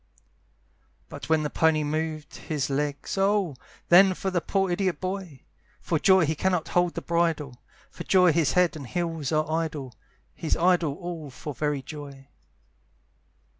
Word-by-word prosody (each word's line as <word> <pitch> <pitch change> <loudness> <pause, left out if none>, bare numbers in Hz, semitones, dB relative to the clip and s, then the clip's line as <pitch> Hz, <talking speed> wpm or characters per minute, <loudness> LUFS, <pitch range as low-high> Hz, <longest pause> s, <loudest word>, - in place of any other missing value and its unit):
But - - -9
when 160 -1 +3
the 150 - -3
pony 160 -1 +2
moved 155 0 -3
his 145 -3 -3
legs, 145 +5 -2
Oh! 195 -6 +1 0.3
then 185 +2 +7
for 190 - -3
the 175 -2 0
poor 195 0 0
idiot 180 -4 0
boy! 185 -7 -5 0.4
For 165 - -1
joy 190 -1 +5
he 155 - 0
cannot 180 +1 -1
hold 175 -1 +1
the - - -4
bridle, 160 -7 -1 0.3
For - - -8
joy 180 -2 +5
his 160 -2 +2
head 180 -2 +3
and 140 -5 -8
heels 165 -2 -3
are 155 -1 +1
idle, 155 -5 -3 0.4
He's 160 - -2
idle 170 -4 +2
all 170 -4 -7
for 145 +3 -7
very 145 +1 -2
joy. 140 -2 -10
160 Hz, 155 wpm, -26 LUFS, 150-180 Hz, 0.4 s, then